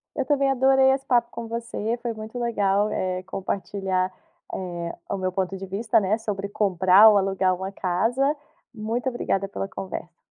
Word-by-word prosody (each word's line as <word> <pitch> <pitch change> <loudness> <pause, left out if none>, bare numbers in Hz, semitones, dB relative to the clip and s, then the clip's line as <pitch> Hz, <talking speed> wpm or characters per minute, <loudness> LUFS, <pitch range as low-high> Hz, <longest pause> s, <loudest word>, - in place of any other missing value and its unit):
Eu 275 - 0
também 280 -2 +2
adorei 265 0 +4
esse 270 0 -2
papo 240 -2 +3
com 235 -1 -6
você 230 0 -3
foi 235 - -2
muito 220 +2 -7
legal, 210 -3 +1
eh, 185 -2 -2
compartilhar, 190 0 -2 0.4
eh, 175 -2 -4 0.2
o - - 0
meu 185 -1 -2
ponto 190 +1 -2
de 195 0 -7
vista, 205 +4 +1
né, 205 +2 +1
sobre 200 -3 -4
comprar 195 0 +5
ou 210 - +6
alugar 190 -1 +1
uma 190 +2 -5
casa. 230 +11 +1 0.4
Muito 230 +3 -2
obrigada 195 -5 -1
pela 195 - -4
conversa. 185 -3 -7
200 Hz, 170 wpm, -24 LUFS, 190-235 Hz, 0.4 s, ou